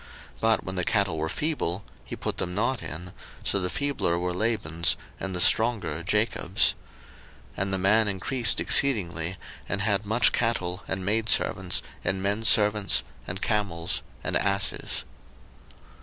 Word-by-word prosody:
01:030:042 -, -, -23 dB
But 110 Hz, 0 st, +2 dB
when 95 Hz, -, -5 dB
the 90 Hz, -, 0 dB
cattle 100 Hz, -4 st, 0 dB
were 80 Hz, +1 st, -2 dB
feeble, 100 Hz, -, -2 dB, 0.2 s
he -, -, -7 dB
put -, -, -4 dB
them 90 Hz, -, -3 dB
not 120 Hz, +3 st, -1 dB
in: 85 Hz, +3 st, -8 dB, 0.3 s
so 100 Hz, -, +2 dB
the 90 Hz, -, -1 dB
feebler 140 Hz, -12 st, -1 dB
were 90 Hz, 0 st, -2 dB
Laban's, 90 Hz, -5 st, -1 dB, 0.2 s
and 95 Hz, -1 st, -4 dB
the -, -, -1 dB
stronger 110 Hz, -6 st, +3 dB
Jacob's. 100 Hz, 0 st, +1 dB, 0.8 s
01:030:043 -, -, -6 dB
And 95 Hz, 0 st, -1 dB
the -, -, +2 dB
man 105 Hz, +4 st, +3 dB
increased 110 Hz, +4 st, +2 dB
exceedingly, 95 Hz, -9 st, +3 dB, 0.3 s
and 95 Hz, -, -1 dB
had 100 Hz, -1 st, +1 dB
much 110 Hz, +4 st, +3 dB
cattle, 95 Hz, -6 st, -1 dB
and 95 Hz, 0 st, -4 dB
maidservants, 105 Hz, -3 st, +1 dB, 0.2 s
and 95 Hz, 0 st, -2 dB
menservants, 105 Hz, 0 st, +3 dB, 0.2 s
and 90 Hz, +2 st, -5 dB
camels, 95 Hz, -6 st, -1 dB, 0.2 s
and -, -, -2 dB
asses. 100 Hz, -1 st, -1 dB
100 Hz, 145 wpm, -26 LUFS, 90-110 Hz, 0.8 s, stronger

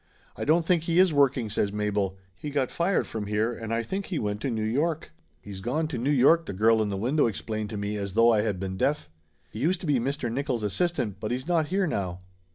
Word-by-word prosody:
"I -, -, -4 dB
don't 160 Hz, +2 st, +3 dB
think 170 Hz, -2 st, +2 dB
he 165 Hz, 0 st, +1 dB
is 185 Hz, -3 st, +5 dB
working!" 135 Hz, -4 st, +3 dB
says 100 Hz, -1 st, 0 dB
Mabel. 105 Hz, -2 st, -1 dB, 0.2 s
"He 150 Hz, -, -6 dB
got 140 Hz, -3 st, -1 dB
fired 180 Hz, +3 st, +1 dB
from 105 Hz, -2 st, -5 dB
here 105 Hz, +3 st, 0 dB
and 115 Hz, -1 st, -6 dB
I 115 Hz, 0 st, 0 dB
think 190 Hz, -, -4 dB
he 180 Hz, -, -2 dB
went 105 Hz, -3 st, -2 dB
to 135 Hz, -, -1 dB
New 110 Hz, -3 st, -2 dB
York." 150 Hz, +9 st, -1 dB, 0.3 s
"He's 100 Hz, -2 st, -9 dB
gone 145 Hz, +9 st, -1 dB
to 140 Hz, -, -3 dB
New 130 Hz, +5 st, 0 dB
York," 150 Hz, +4 st, +4 dB
the -, -, -4 dB
girl 110 Hz, +3 st, +4 dB
in 105 Hz, -, 0 dB
the 100 Hz, -, -2 dB
window 130 Hz, +7 st, +2 dB
explained 110 Hz, -1 st, -4 dB
to 105 Hz, -, -5 dB
me 100 Hz, +1 st, -3 dB
as 100 Hz, -2 st, -4 dB
though 115 Hz, +2 st, +5 dB
I 105 Hz, -, +3 dB
had 105 Hz, -4 st, -1 dB
been 95 Hz, 0 st, -4 dB
deaf. 145 Hz, -, 0 dB, 0.4 s
"He 110 Hz, -, -7 dB
used 170 Hz, +7 st, +1 dB
to -, -, -6 dB
be 145 Hz, -5 st, +2 dB
Mr. 130 Hz, -1 st, -2 dB
Nickoll's 130 Hz, -2 st, -2 dB
assistant, 105 Hz, -, -1 dB
but 105 Hz, -, -3 dB
he's 130 Hz, +4 st, -3 dB
not 165 Hz, -3 st, +2 dB
here 190 Hz, +3 st, +1 dB
now." 95 Hz, -, -3 dB
120 Hz, 250 wpm, -27 LUFS, 105-150 Hz, 0.4 s, is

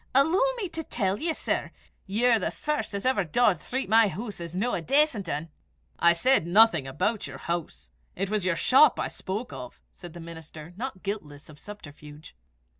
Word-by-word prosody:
"Alloo 320 Hz, -, +4 dB, 0.2 s
me 420 Hz, -5 st, -3 dB
to 325 Hz, -1 st, -5 dB
tell 200 Hz, -8 st, -1 dB
ye, 325 Hz, +3 st, 0 dB
sir, -, -, -2 dB, 0.4 s
ye're 230 Hz, +4 st, +3 dB
the -, -, -1 dB
first 300 Hz, -8 st, -3 dB
'at 200 Hz, -, -4 dB
ever 255 Hz, -6 st, +2 dB
daured 180 Hz, +1 st, +2 dB
threep 260 Hz, -, -3 dB
my 220 Hz, +2 st, +5 dB
hoose 210 Hz, +1 st, -6 dB
was 170 Hz, 0 st, -7 dB
no 230 Hz, +7 st, 0 dB
a -, -, -1 dB
dacent 265 Hz, -, +1 dB
ane." 155 Hz, +3 st, -3 dB, 0.5 s
"I 170 Hz, -, +6 dB
said 170 Hz, 0 st, +2 dB
nothing 185 Hz, -6 st, +5 dB
about 185 Hz, -, -1 dB
your -, -, -8 dB
house. 165 Hz, -, -5 dB, 0.2 s
It 195 Hz, +2 st, -2 dB
was 210 Hz, 0 st, -1 dB
your 185 Hz, -2 st, +1 dB
shop 265 Hz, -, +5 dB
I -, -, 0 dB
spoke 210 Hz, +6 st, -5 dB
of," 125 Hz, -1 st, -9 dB
said 175 Hz, -2 st, -12 dB
the 175 Hz, -, -9 dB
minister, 165 Hz, 0 st, -10 dB
not 230 Hz, -3 st, -6 dB
guiltless 155 Hz, -9 st, -6 dB
of 150 Hz, -1 st, -14 dB
subterfuge. 150 Hz, -6 st, -12 dB
195 Hz, 190 wpm, -27 LUFS, 165-245 Hz, 0.5 s, I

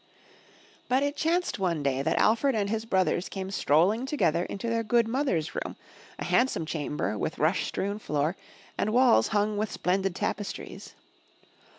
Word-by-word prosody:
But 260 Hz, +2 st, +3 dB
it 285 Hz, 0 st, -1 dB
chanced 330 Hz, -, 0 dB
one 170 Hz, -6 st, 0 dB
day 135 Hz, -1 st, 0 dB
that -, -, 0 dB
Alfred 230 Hz, +4 st, +3 dB
and 200 Hz, -2 st, 0 dB
his 225 Hz, 0 st, -2 dB
brothers 190 Hz, -3 st, +1 dB
came 190 Hz, -1 st, -5 dB
strolling 195 Hz, -, +2 dB
together 180 Hz, -, +1 dB
into 200 Hz, +4 st, -5 dB
their 230 Hz, 0 st, +1 dB
good 230 Hz, +1 st, +2 dB
mother^s 225 Hz, -, -1 dB
room, -, -, -4 dB, 0.4 s
a -, -, -5 dB
handsome 250 Hz, -10 st, +2 dB
chamber 150 Hz, -8 st, -3 dB
with 160 Hz, -, -3 dB
rush 160 Hz, +5 st, +1 dB
strewn 200 Hz, +2 st, -3 dB
floor, 150 Hz, -2 st, -1 dB, 0.4 s
and 215 Hz, -, 0 dB
walls 240 Hz, -, +5 dB
hung 210 Hz, 0 st, 0 dB
with 215 Hz, 0 st, -1 dB
splendid 190 Hz, 0 st, 0 dB
tapestries. 205 Hz, +1 st, -5 dB
200 Hz, 160 wpm, -28 LUFS, 170-230 Hz, 0.4 s, walls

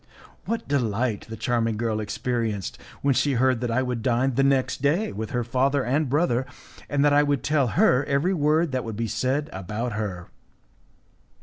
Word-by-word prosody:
What 230 Hz, 0 st, -3 dB
delight 120 Hz, -4 st, -1 dB
the 115 Hz, -, -6 dB
charming 115 Hz, -1 st, 0 dB
girl 110 Hz, -1 st, -1 dB
experienced 110 Hz, -2 st, -3 dB, 0.2 s
when 140 Hz, -1 st, +3 dB
she 140 Hz, +2 st, +1 dB
heard 130 Hz, -1 st, +2 dB
that 120 Hz, -, -1 dB
I 125 Hz, +3 st, +1 dB
would 125 Hz, -2 st, -3 dB
dine 125 Hz, +3 st, +1 dB
the 135 Hz, -, +2 dB
next 135 Hz, -1 st, +1 dB
day 155 Hz, +10 st, +1 dB
with 110 Hz, +2 st, -5 dB
her 120 Hz, -1 st, -1 dB
father 130 Hz, +3 st, +1 dB
and 140 Hz, +3 st, +1 dB
brother, 130 Hz, -3 st, +1 dB, 0.4 s
and 145 Hz, 0 st, +2 dB
that 145 Hz, -, +4 dB
I 145 Hz, -, +6 dB
would 145 Hz, -3 st, 0 dB
tell 145 Hz, -3 st, +2 dB
her 125 Hz, +2 st, +4 dB
every 145 Hz, +7 st, +1 dB
word 155 Hz, 0 st, +2 dB
that 130 Hz, -1 st, -1 dB
would 115 Hz, -2 st, -6 dB
be 115 Hz, 0 st, -1 dB
said 130 Hz, +7 st, -1 dB
about 105 Hz, +6 st, -4 dB
her! 100 Hz, -5 st, -4 dB
125 Hz, 185 wpm, -25 LUFS, 115-140 Hz, 0.4 s, I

